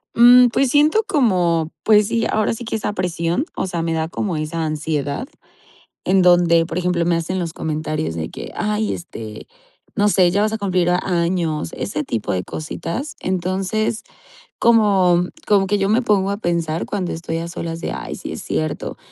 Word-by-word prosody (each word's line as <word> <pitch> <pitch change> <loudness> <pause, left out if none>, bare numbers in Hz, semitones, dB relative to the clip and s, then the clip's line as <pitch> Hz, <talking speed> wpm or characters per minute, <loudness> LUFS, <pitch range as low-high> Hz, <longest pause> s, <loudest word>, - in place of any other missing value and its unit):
Mm, 245 +1 +8
pues, 255 +2 +1
siento 305 +10 +4
como, 175 - +2
pues 210 -1 +5
sí, 230 0 0
ahora 215 +1 +1
sí 235 +1 -7
que, 225 - -3
esa 210 -1 -2
presión, 175 - -1
o - - -2
sea, 170 -2 -3
me 165 0 -1
da 160 0 -1
como 175 +2 -3
esa 160 +2 -3
ansiedad 155 - -2 0.8
en 190 0 +3
donde, 175 -2 +5
por 170 - -4
ejemplo, 180 -1 0
me 170 0 +2
hacen 175 +3 -2
los 170 -3 -3
comentarios 155 - -3
de 80 -1 -4
que, - - -8
ay, 210 0 -1
este, 110 -11 -8 0.5
no 205 -1 +3
sé: 185 -3 +4
"Ya 200 +3 +1
vas 215 0 +1
a 220 - -2
cumplir 185 -3 +1
años", 170 -3 0
ese 150 -6 -3
tipo 115 -5 -2
de 90 -1 -1
cositas, 170 - -5
entonces, 190 +4 -1 0.6
como 195 -6 +4 0.2
como 200 -2 +4
que 205 +1 +1
yo 195 +1 +1
me 225 +4 +3
pongo 200 -3 +2
a 200 - -2
pensar 170 -4 -1
cuando 190 -4 -3
estoy 165 0 -4
a 165 - -4
solas 165 -1 -5
de: - - -4
"Ay, - - -6
sí - - -7
es - - -6
cierto, 80 0 -3
180 Hz, 185 wpm, -20 LUFS, 165-210 Hz, 0.8 s, Mm